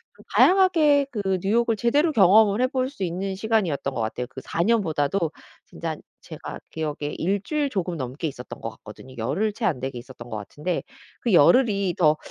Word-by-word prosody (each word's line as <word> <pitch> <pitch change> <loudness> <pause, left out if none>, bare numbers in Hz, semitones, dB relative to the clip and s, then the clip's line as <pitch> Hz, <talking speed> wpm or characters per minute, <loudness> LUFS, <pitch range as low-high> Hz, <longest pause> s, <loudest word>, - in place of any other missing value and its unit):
좀 - - -18
다양하게 320 -7 +5
그 195 -5 -1
뉴욕을 225 +4 +2
제대로 285 +9 +2
경험을 210 -1 +5
해볼 255 0 0
수 270 -8 -6
있는 190 +2 -3
시간이었던 190 -10 0
것 120 - -2
같아요. 115 +3 -3
그 135 - -9
4 165 - -3
년보다도 170 -5 +1 0.3
진짜 - - -5 0.3
제가 - - -8
기억에 150 -2 -4
1 195 +4 0
주일 295 +3 -1
조금 180 -5 -2
넘게 130 +4 -4
있었던 125 -4 -8
것 115 - -3
같거든요. 110 +4 -13
열흘 165 - 0
채 225 +1 -4
안 150 -8 +1
되게 130 0 -4
있었던 120 -1 -12
것 110 - -4
같은데 150 - -4 0.4
'그 235 - 0
열흘이 200 - +4
더 155 -3 +4
190 Hz, 355 characters per minute, -24 LUFS, 145-225 Hz, 0.4 s, 다양하게